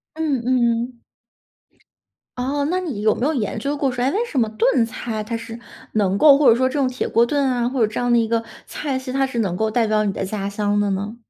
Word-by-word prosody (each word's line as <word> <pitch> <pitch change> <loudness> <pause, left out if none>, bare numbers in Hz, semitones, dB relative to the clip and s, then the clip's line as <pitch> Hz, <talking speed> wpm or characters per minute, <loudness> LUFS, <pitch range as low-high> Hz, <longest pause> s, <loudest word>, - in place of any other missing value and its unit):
嗯 300 -6 -1
嗯。 240 -1 0 1.4
哦， 280 +3 -1
那 370 - +1
你 295 - -4
有 215 0 +3
没 250 - -2
有 310 - +1
研 220 -5 -2
究 280 +5 -2
过 280 -2 0
说， 245 0 -2
诶， 265 - +3
为 445 +8 0
什 300 - -2
么 225 - +2
炖 250 - +2
菜 225 -1 -5
它 230 +2 -4
是 230 0 -7 0.3
能 200 -3 +1
够 280 +3 +7
或 295 - +3
者 230 - +6
说 260 +2 +2
这 - - -8
种 270 - +2
铁 255 0 -3
锅 230 +1 +3
炖 285 +3 0
啊， 245 -2 0
或 255 -1 -2
者 - - -3
这 - - -3
样 245 0 0
的 240 - +5
一 230 -1 +2
个 230 0 0 0.2
菜 280 -3 -3
系， 260 0 -6
它 270 +1 +1
是 245 -3 -4
能 195 -6 0
够 220 +2 0
代 230 +1 +1
表 215 0 +1
你 200 - -1
的 - - -4
家 195 0 -3
乡 205 0 0
的 205 0 +1
呢？ 205 +4 -3
240 Hz, 275 characters per minute, -21 LUFS, 215-270 Hz, 1.4 s, 够